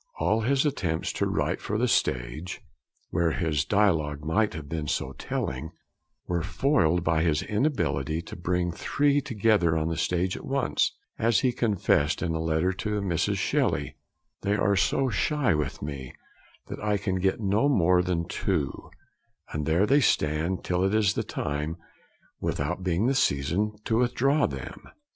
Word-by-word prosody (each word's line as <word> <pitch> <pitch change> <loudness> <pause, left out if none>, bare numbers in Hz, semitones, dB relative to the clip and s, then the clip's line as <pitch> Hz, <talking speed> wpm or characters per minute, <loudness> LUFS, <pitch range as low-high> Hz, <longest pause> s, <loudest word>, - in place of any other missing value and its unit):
All 110 +1 +2
his 135 +5 +2
attempts 90 - -1
to - - 0
write - - -1
for 105 - -2
the 125 +3 +2
stage 65 - -1 0.5
(where 85 -1 +2
his 80 -5 0
dialogue 80 -8 +1
might 105 +4 +1
have 75 -2 -7
been 80 -1 -4
so - - -1
telling) 65 +5 -4 0.5
were 85 -1 -1
foiled 90 - +1
by 80 -1 +2
his 80 -2 +1
inability 80 - 0
to - - -9
'bring 90 0 -1
three 145 +11 +1
together 105 -9 +2
on 80 +1 0
the 80 - -3
stage 90 +1 0
at - - -8
once,' 135 -2 +1 0.3
as 115 0 +3
he 130 - +2
confessed 100 -11 +1
in 85 -2 -1
a 80 - -2
letter 80 +3 +1
to 105 +3 -2
Mrs. 90 -5 0
Shelley; - - 0 0.5
'they 100 +1 +1
are 100 0 +2
so 130 +7 +2
shy 135 - +1
with 75 -3 -3
me, 70 -3 -6 0.5
that - - -7
I 105 -1 +1
can 95 -2 -2
get 95 +4 +1
no 105 +6 +2
more 90 -8 +4
than 85 -2 -1
two; 85 -8 -2 0.6
and 75 -1 -2
there 85 +5 +3
they 140 +6 +4
stand 80 - +1
till 90 0 0
it 95 +2 +1
is 105 -2 +3
the - - -1
time, 75 +3 -3 0.6
without - - -2
being 90 +3 0
the 135 - +3
season, 100 - +1
to 115 0 +1
withdraw 135 +4 +2
them.' - - -8
90 Hz, 165 wpm, -27 LUFS, 80-110 Hz, 0.6 s, more